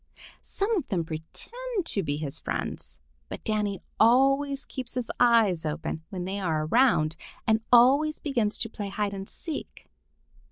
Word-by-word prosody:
Some 420 +3 -1
of 340 -9 -2
them 175 -5 -1
pretend 390 - -5
to 200 - +1
be 145 -4 -2
his 150 -3 -4
friends, - - -4 0.3
but - - -7
Danny 210 -3 -1 0.2
always 275 +4 +4
keeps 255 -2 -6
his 250 -2 -2
eyes 225 -8 +4
open 155 +1 -3
when 185 -4 -4
they 195 +2 -3
are 160 -5 0
around 165 -6 +3 0.3
and 220 0 +3
always 275 +6 +6
begins 235 -8 0
to 225 - +1
play 210 -2 -6
hide 200 0 -2
and 195 0 -6
seek. 320 -4 -6
220 Hz, 155 wpm, -27 LUFS, 180-270 Hz, 0.3 s, always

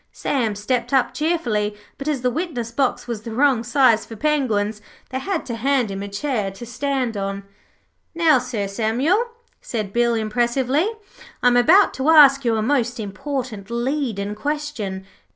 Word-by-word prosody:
Sam 230 -7 -1
stepped 240 +6 -2
up 265 -2 +3
cheerfully, 235 -11 -1 0.2
but, 275 - -6
as 290 -5 0
the 250 - +2
witness 245 -7 -3
box 260 +1 0
was 230 -3 -4
the 230 - -7
wrong 260 -3 +3
size 245 -3 +3
for 225 - -10
Penguins, 220 -6 0 0.3
they 260 - -2
had 370 +3 -3
to 240 - -4
hand 245 -1 +1
him 195 0 -5
a 200 - -5
chair 210 0 -2
to 195 +5 -9
stand 255 -1 -2
on. 195 0 -3 0.7
'Now, 320 -5 +4
Sir 240 -5 -3
Samuel,' 250 - +1 0.3
said 215 -4 -4
Bill, 235 0 +2
impressively, 245 - +1 0.5
'I - - +5
am 245 - +2
about 330 +12 +5
to 265 +3 -1
ask 280 -3 +7
you 230 -2 +2
a 215 - 0
most 245 -1 0
important 215 0 -5
leadin' 235 -4 -2
question. 220 -6 -4
245 Hz, 165 wpm, -21 LUFS, 215-280 Hz, 0.7 s, ask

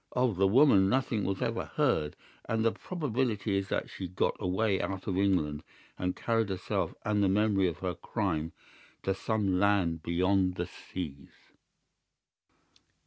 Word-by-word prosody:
Of 125 -6 +1
the 95 +1 +4
woman 100 -4 +5
nothing 125 -4 0
was 95 0 -1
ever - - -1
heard, 75 -1 +1 0.3
and 110 0 0
the 115 - +4
probability 120 - -2
is 100 0 -1
that - - -1
she 95 - -6
got 90 +1 0
away 95 +1 +1
out 95 +1 -4
of 95 - -1
England 90 -7 +1 0.3
and 90 0 -2
carried 115 -2 0
herself 95 -1 -2
and 105 -1 +2
the 100 - +3
memory 100 -1 +3
of 85 - -3
her 90 - 0
crime 85 -5 -2 0.5
to 95 - +1
some 100 -2 0
land 95 -5 +2
beyond 90 +3 +1
the 90 - -2
seas." 75 -6 -7
95 Hz, 150 wpm, -30 LUFS, 90-110 Hz, 0.5 s, woman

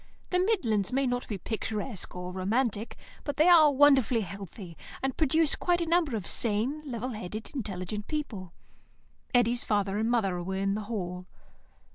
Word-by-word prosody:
The 360 - +2
midlands 255 - +1
may 270 +2 +1
not 245 -1 -1
be 210 - -3
picturesque 215 +1 -4
or 180 0 -5
romantic, 215 +4 -1 0.3
but 290 -2 -4
they 310 +3 +5
are 320 -4 +8
wonderfully 265 -4 +5
healthy, 195 -2 -8 0.3
and 270 -1 0
produce 315 0 +3
quite 350 -1 +1
a 340 - 0
number 330 -6 +2
of 205 -5 -4
sane, 235 - 0
level 245 +1 -3
headed, 215 -1 -6
intelligent 210 -4 -4
people. 220 - -4 0.8
Eddy's 245 -1 +3
father 205 -1 0
and 225 +1 +1
mother 195 -7 +1
were 190 +2 -3
in 195 +1 0
the 215 - -2
hall. 180 -4 -4
225 Hz, 160 wpm, -29 LUFS, 195-275 Hz, 0.8 s, are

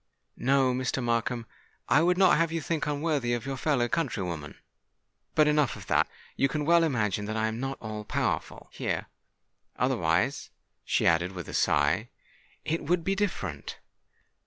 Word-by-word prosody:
No, 130 -1 +3
Mr. 130 0 -1
Markham—I 120 +4 -1
would 180 +2 +3
not 190 -1 +6
have 165 +1 +1
you 165 - -1
think 160 -1 -2
unworthily 145 -4 0
of 120 +1 -2
your 135 0 -3
fellow 130 -2 +1
countrywoman. 95 - -3 0.8
But, 155 -1 +5
enough 150 -4 +2
of - - -10
that! - - +2 0.3
You 135 - +3
can 150 +1 -2
well 170 +1 +5
imagine 105 - 0
that 110 +1 -3
I 110 - +1
am 110 +1 -2
not 135 +1 -3
all 110 -1 -6
powerful - - -2
here:—otherwise," 85 - -2 0.3
she - - +1
added, 85 +3 +3
with 90 -2 -7
a - - -7
sigh, - - +2 0.6
"it 165 +2 -1
would 170 +3 +1
be 195 - +1
different! 135 - -3
130 Hz, 155 wpm, -28 LUFS, 110-155 Hz, 0.8 s, not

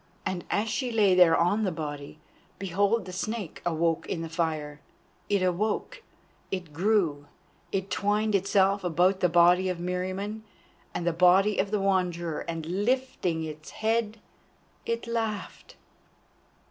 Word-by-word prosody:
And 180 -2 -2
as 210 +2 0
she 250 +3 -2
lay 210 -4 +4
there 180 -3 +6
on 190 +6 +2
the 190 - 0
body, 145 -2 -6 0.4
behold 200 +3 0
the 185 - -8
Snake 210 -1 -4
awoke 165 -1 0
in 165 -3 -3
the 165 - -5
fire. 155 -3 -2 0.5
It 200 -2 +2
awoke, 210 - -1 0.5
it 180 -5 -5
grew, 165 -5 +1 0.4
it 190 0 -2
twined 210 +2 +1
itself 195 0 +2
about 180 +2 +2
the 180 - +3
body 175 +2 +5
of 180 - -2
Meriamun 185 +4 -3 0.5
and 170 - -2
the 175 - +1
body 185 +4 +4
of 195 - +1
the 210 0 0
Wanderer, 180 -4 0
and 165 -2 -4 0.2
lifting 235 -9 0
its 155 -1 -7
head, 220 0 -1 0.7
it 230 0 -2
laughed. 225 -3 -4
185 Hz, 140 wpm, -27 LUFS, 170-210 Hz, 0.7 s, there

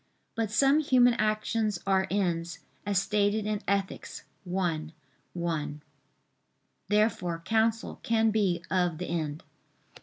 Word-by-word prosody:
But 225 -2 -1
some 275 +7 +4
human 250 -5 +5
actions 215 -1 0
are 190 -1 +2
ends, 175 -4 -1 0.3
as 200 -2 +1
stated 205 +1 +1
in 210 -1 -1
Ethic. 195 -1 -1 0.4
i, 175 -4 -1 0.5
1. 155 -4 -3 1.1
Therefore 200 -5 +1
counsel 225 0 +1
can 225 -1 +2
be 190 -5 +1
of 180 -3 +1
the 180 - -4
end. 155 -3 -3
200 Hz, 115 wpm, -29 LUFS, 175-220 Hz, 1.1 s, human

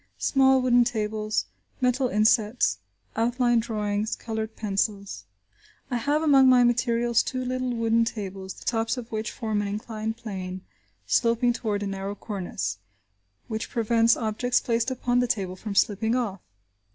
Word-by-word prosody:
Small 265 -1 +3
wooden 245 -1 +5
tables; 215 -2 -1 0.3
metal 255 0 +2
insets, 215 - +2 0.4
outline 240 +1 +2
drawings, 210 -1 -2
coloured 220 -1 -5
pencils. 200 - -2 0.7
I 245 - +1
have 290 +6 0
among 270 -4 +6
my 250 -1 +6
materials 240 -1 +2
two 255 -1 -3
little 255 0 -2
wooden 230 0 +2
tables, 195 -4 -5
the - - -14
tops 225 +1 0
of 240 -2 -7
which 220 0 -2
form 220 -3 -2
an 205 - -2
inclined 220 +1 -4
plane 190 -5 -6 0.4
sloping 235 +1 +2
toward 210 -4 -2
a - - -2
narrow 195 +1 -4
cornice, 175 - -4 0.7
which 220 -1 -4
prevents 230 0 +3
objects 235 +2 0
placed 230 +1 0
upon 245 -1 0
the 245 - +2
table 190 -5 -2
from 200 +1 -6
slipping 220 +4 +2
off. 210 -7 -2
225 Hz, 145 wpm, -26 LUFS, 210-245 Hz, 0.7 s, among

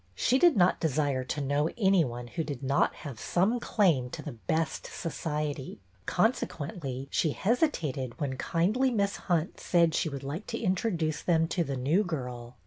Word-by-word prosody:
She 255 - +2
did 345 -5 +5
not 180 -1 +4
desire 145 -4 0
to 145 +3 -3
know 145 +3 +1
any 195 -5 +4
one 120 -2 -5
who 165 +7 -3
did 140 -4 -6
not 135 +1 +2
have 135 -6 -6
some 200 - +1
claim 165 - +2
to - - -7
the 150 - -5
'' 115 -3 -17
best 165 -1 -2
society," 150 -6 -4 0.3
consequently 160 - -1
she 155 -4 +1
hesitated 170 - 0
when 140 -4 -2
kindly 200 - +1
Miss 200 -4 0
Hunt 170 -2 0
said 170 -2 +3
she 160 - +1
would 140 -1 -6
like 150 +9 -5
to 230 - -3
introduce 180 -6 0
them 165 -2 +2
to 175 - +1
the 140 -4 -3
new 150 +11 +2
girl. 125 - -5
160 Hz, 175 wpm, -29 LUFS, 135-185 Hz, 0.3 s, did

